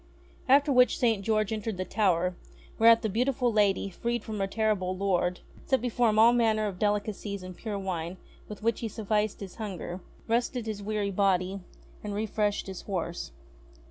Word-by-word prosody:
After 280 +1 +5
which 250 0 +5
St. 225 -5 +1
George 215 0 +1
entered 215 -2 -3
the 185 - -2
tower; 180 -4 +1 0.4
whereat 230 0 +6
the - - +1
beautiful 245 +3 +1
lady, 200 -2 +2
freed 235 +4 -2
from 215 -2 -5
her 195 - 0
terrible 195 -3 0
lord, 180 -2 0 0.3
set 265 -2 +3
before 240 0 +1
him 215 - 0
all 230 +2 +7
manner 220 -3 +2
of 195 -3 -4
delicacies 205 -1 -1
and 185 0 -8
pure 210 0 -4
wine 185 -2 -4 0.3
with 210 0 -9
which 230 0 +1
he 230 - -3
suflRced 210 -1 -1
his 190 -2 -8
hunger, 190 -4 -5 0.3
rested 235 +1 0
his 215 -2 -4
weary 205 -1 -2
body, 195 -1 +1 0.4
and 205 -1 -4
refreshed 210 -1 -1
his 190 -2 -7
horse. 175 - -4
210 Hz, 175 wpm, -28 LUFS, 195-225 Hz, 0.4 s, all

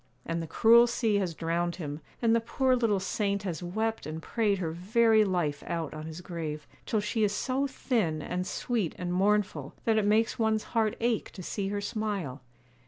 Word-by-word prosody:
And 165 0 -2
the 165 - -5
cruel 235 +7 +6
sea 225 -3 +1
has 180 -5 -1
drowned 170 +1 -1
him, 150 -4 -5 0.2
and 230 0 +4
the 230 - +2
poor 260 +3 +2
little 225 -5 +2
saint 200 0 -1
has 180 -4 -3
wept 220 +5 -2
and 155 +1 -4
prayed 205 +3 0
her 170 -4 -2
very 220 +6 +4
life 175 -7 0
out 165 -3 -3
on 155 0 -6
his 160 +2 -7
grave; 160 -4 -5 0.2
till 215 - +1
she 220 +1 0
is 205 0 +1
so 265 +5 0
thin, 220 - 0
and 180 +4 -3
sweet, 225 -9 -1
and 180 -1 -3
mournful, 190 -7 +1
that 220 -1 +3
it 210 - 0
makes 220 +3 +2
one's 220 -1 +2
heart 220 -2 +2
ache 230 -1 0
to 185 - -8
see 195 +3 -3
her 205 +1 -2
smile. 200 - -3
200 Hz, 195 wpm, -29 LUFS, 170-225 Hz, 0.2 s, cruel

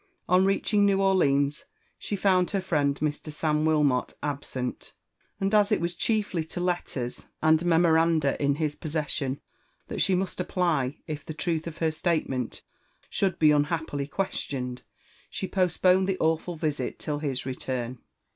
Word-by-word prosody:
On 185 +1 +4
reaching 205 +1 +2
New 200 -1 +3
Orleans, 150 -7 +2 0.3
she 205 - -3
found 185 -2 +3
her 200 - 0
friend 145 -6 +1
Mr. 150 +1 -2
Sam 150 0 0
Wilmot 150 -5 +2
absent; 135 -3 -4 0.4
and 195 +1 0
as 210 0 +4
it 210 - +3
was 170 +1 -2
chiefly 205 -3 0
to 160 +3 -7
letters 175 -9 -3
and 155 +1 +4
memoranda 165 -3 +3
in 140 -1 +2
his 150 -1 -1
possession 150 -3 -2 0.5
that - - -2
she 190 - +4
must 185 0 -2
apply 165 -7 0
if 150 -3 -5
the 155 - -7
truth 160 0 -1
of 165 - -7
her 160 -1 +1
statement 155 -7 -2 0.5
should 190 -3 0
be 155 -1 +5
unhappily 145 -1 0
questioned, 135 -8 -3 0.5
she 190 - -4
postponed 185 0 +3
the 190 - 0
awful 160 +2 0
visit 150 -5 -2
till 150 -1 -3
his 140 -5 -2
return. 130 -1 -4
160 Hz, 150 wpm, -27 LUFS, 145-180 Hz, 0.5 s, be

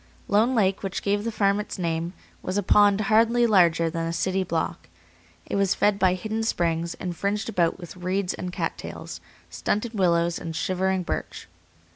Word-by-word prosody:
Lone 220 +5 +3
Lake, 195 -3 +2
which 195 -1 -4
gave 205 +1 0
the 230 - -2
farm 200 -1 +2
its 210 - -5
name, 170 -1 -2 0.3
was 185 +2 -3
a 205 - +1
pond 205 +1 +4
hardly 230 +3 +3
larger 170 -6 +4
than 165 0 -2
a - - -2
city 190 +2 0
block. 170 - -3 0.6
It - - -2
was 195 -1 +2
fed 205 -1 +2
by 185 -2 +3
hidden 215 +4 -3
springs, 170 -5 -1
and 180 -2 -5
fringed 200 +5 -2
about 175 -6 +1
with 175 0 -10
reeds 185 +1 -1
and 180 - -5
cat - - -3
tails, - - -8 0.3
stunted 220 +3 -2
willows 175 -3 +2
and 165 -1 -6
shivering 185 +2 0
birch. - - -5
190 Hz, 180 wpm, -25 LUFS, 175-205 Hz, 0.6 s, pond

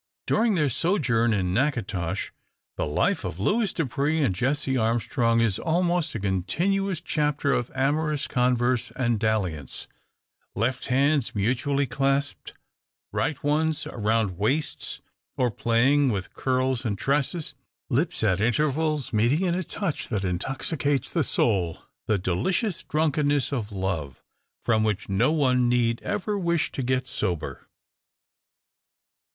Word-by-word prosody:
Daring 220 -1 +2
their 155 -4 +2
sojourn 130 - +1
in 95 -4 0
Natchitoches 105 - -1 0.4
the - - -2
life 75 - +1
of 85 - -5
Louis 210 - +1
Dupre 145 +2 0
and 120 - +2
Jessie 135 +6 0
Armstrong 115 0 +1
is 110 -4 +2
almost 175 -2 0
a - - -2
continuous 175 - 0
chapter 150 -3 0
of 120 - -1
amorous 150 +2 0
converse 125 -1 +1
and 120 -4 0
dalliance; 95 - -2 0.7
left 125 +5 -1
hands 140 0 +2
mutually 130 +7 +1
clasped, 135 +2 -1 0.6
right 150 - -2
ones 155 +2 +1
around 110 -4 -1
waists, 140 +9 -1 0.4
or 125 -2 +2
playing 130 +6 +3
with 95 -4 -4
curls 130 -1 0
and 105 -5 -2
tresses; 145 - 0 0.3
lips 150 +2 0
at 95 -3 +2
intervals 150 +4 0
meeting 120 +9 +2
in 175 -2 +1
a 180 - 0
touch 180 -2 -3
that 105 -4 -2
intoxicates 135 - -1
the 165 - +1
soul 95 -11 +1 0.3
the 105 - +2
delicious 155 - 0
drunkenness 150 -3 +1
of 115 -5 -3
love, 90 -9 -3 0.4
from 110 -1 +3
which 105 -2 -1
no 110 +9 +2
one 130 -5 +2
need 115 -1 +1
ever 205 0 -2
wish 170 -3 +1
to - - -3
get 130 0 0
sober. 105 - -3
130 Hz, 130 wpm, -25 LUFS, 110-150 Hz, 0.7 s, playing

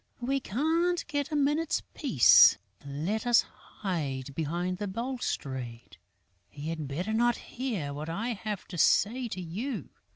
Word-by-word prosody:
We 270 +3 0
can't 325 - 0
get 290 0 -2
a - - -1
minute's 295 +3 +1
peace. 165 - +7 0.3
Let 160 - -3
us 240 -1 +6
hide 140 -9 -5
behind 175 +5 -2
the 205 - -2
balustrade. 140 - -4 0.5
He 145 +2 -6
had 160 -3 -4
better 175 +10 -3
not 240 +2 +3
hear 215 - -4
what 150 +3 -5
I 215 +9 -2
have 215 -3 -4
to 175 - -5
say 240 - +3
to 190 - -6
you." 195 - -4
205 Hz, 140 wpm, -29 LUFS, 155-255 Hz, 0.5 s, peace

